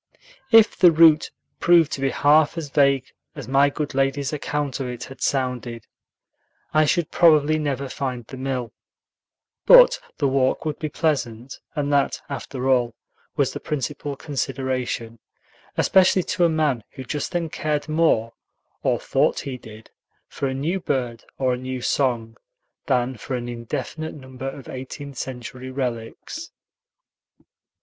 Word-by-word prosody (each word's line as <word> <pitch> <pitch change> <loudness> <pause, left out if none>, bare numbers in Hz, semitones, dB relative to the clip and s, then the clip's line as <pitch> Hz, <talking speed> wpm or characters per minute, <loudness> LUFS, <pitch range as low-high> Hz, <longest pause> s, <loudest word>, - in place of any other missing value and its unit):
If 225 -2 +6
the 175 -2 +6
route 160 -1 +6 0.3
proved 170 -3 +5
to 135 - -4
be 135 - +2
half 150 +4 +3
as 150 -4 -5
vague 140 -3 +2 0.2
as - - -8
my 140 +2 +4
good 145 0 -4
lady's 135 +1 0
account 145 -2 -2
of 130 - -3
it 125 -1 -6
had 135 - -11
sounded, 125 -4 -2 0.9
I 155 0 +5
should 165 +1 0
probably 155 -2 +4
never 140 -2 -2
find 125 -3 -4
the 135 - -10
mill; 130 -3 -3 0.9
but - - +8 0.2
the 145 - +1
walk 130 +2 +1
would 150 -2 -3
be 155 - -3
pleasant, 130 -5 -2 0.2
and 145 -1 -1
that, 140 -1 +2
after 135 -2 -4
all, 120 -3 +2 0.4
was 140 -4 +1
the - - -5
principal 145 0 -4
consideration, 130 -5 -3 0.6
especially 185 -1 +4
to 175 - +1
a - - +4
man 150 -7 0
who 130 - -7
just 145 +5 -4
then 175 -2 -1
cared 150 -1 -2
more, 155 -8 +2 0.5
or - - +1
thought - - +1
he 135 - -5
did, 110 -2 -13 0.4
for 140 - -3
a 130 - -2
new 165 +8 -1
bird 125 -8 -3
or 130 -2 +1
a - - -2
new 130 0 -5
song 120 -3 -1 0.5
than 125 -2 +1
for 130 +4 -4
an 120 -1 -4
indefinite 130 +7 -5
number 130 -1 -7
of 135 0 -10
eighteenth 130 +1 -7
century 130 0 -6
relics. 130 - -5
135 Hz, 150 wpm, -23 LUFS, 125-150 Hz, 0.9 s, but